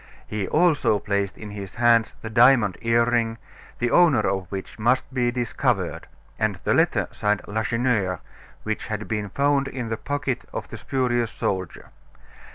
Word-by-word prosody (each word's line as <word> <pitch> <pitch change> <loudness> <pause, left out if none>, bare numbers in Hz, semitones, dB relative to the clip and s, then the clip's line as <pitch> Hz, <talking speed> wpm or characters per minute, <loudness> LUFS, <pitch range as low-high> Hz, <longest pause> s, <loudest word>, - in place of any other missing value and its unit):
He 105 -3 -3
also 155 -10 +3
placed 100 -1 -2
in 105 -1 -8
his 100 -2 -8
hands 120 -1 +3
the 110 - -4
diamond 120 -4 +5
earring, 115 0 +2 0.4
the 120 0 0
owner 160 -10 +5
of 95 -1 -1
which 95 +2 -6
must 125 +4 +1
be 125 -2 +1
discovered; 120 -1 -1 0.3
and 105 -4 0
the - - +2
letter - - +2
signed 105 -1 0
"Lacheneur," 110 -3 0 0.4
which 110 0 -3
had 105 -1 -4
been 105 -2 -2
found 140 +4 +1
in 125 -4 -5
the 115 - -2
pocket 140 -1 -2
of - - -4
the - - -7
spurious 120 -3 0
soldier. 95 -5 -4
115 Hz, 155 wpm, -24 LUFS, 105-125 Hz, 0.4 s, diamond